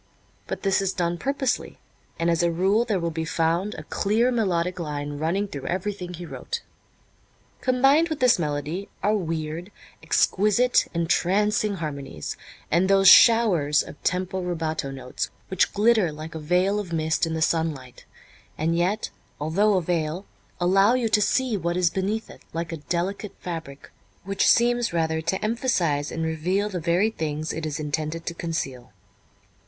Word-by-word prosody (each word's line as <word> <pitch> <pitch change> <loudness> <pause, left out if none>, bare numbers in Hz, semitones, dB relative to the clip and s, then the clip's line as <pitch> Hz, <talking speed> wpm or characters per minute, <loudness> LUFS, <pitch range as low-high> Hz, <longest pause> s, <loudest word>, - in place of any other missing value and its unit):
But - - -5
this 195 -1 +2
is 195 -1 -1
done 175 -1 -1
purposely, 275 -2 -1 0.4
and 170 +1 +1
as 170 - +1
a 170 - +3
rule 195 +7 +2
there 210 -5 0
will 170 -1 -2
be 160 0 -3
found 165 +5 0
a - - -7
clear 225 +5 +1
melodic 180 -6 0
line 145 -2 -4
running 180 +6 0
through 140 -8 -7
everything 185 -1 -3
he 175 +1 -8
wrote. 470 - -5 1.0
Combined 270 +6 +3
with 315 - -3
this 250 -6 +4
melody 155 +5 -3
are 210 +2 +3
weird, 165 -1 -3 0.3
exquisite, 215 +5 +2
entrancing 200 +5 +1
harmonies, 140 - -5 0.4
and 175 +4 +3
those 195 0 +5
showers 180 -13 +6
of - - -12
tempo 185 +1 -1
rubato 160 -5 -2
notes 130 -2 -5 0.2
which 190 - +2
glitter 210 -4 +3
like 155 +2 -8
a 160 - -5
veil 180 +6 +1
of 190 -5 -6
mist 160 0 0
in 160 - -3
the - - -2
sunlight 155 -7 -2 0.5
and 165 +2 0
yet, 180 +5 0 0.3
although 195 +8 +2
a 185 - +1
veil, 165 +2 -2 0.3
allow 195 +6 +4
you 240 -3 0
to 210 -1 +3
see 255 +2 +1
what 175 -2 -1
is 175 -2 +2
beneath 205 +4 -2
it, - - -14
like 165 0 -3
a 165 - -4
delicate 180 +6 -3
fabric 160 -5 -7 0.3
which 195 +1 0
seems 240 -2 +3
rather 160 -1 0
to 170 +4 -1
emphasize 180 - 0
and 165 - -3
reveal 180 +6 0
the 185 -3 -3
very 175 +6 +2
things 155 -4 -3
it 160 0 -3
is 150 -1 -4
intended 155 +2 -3
to 170 - -3
conceal. 135 -8 -4
175 Hz, 160 wpm, -25 LUFS, 160-205 Hz, 1.0 s, showers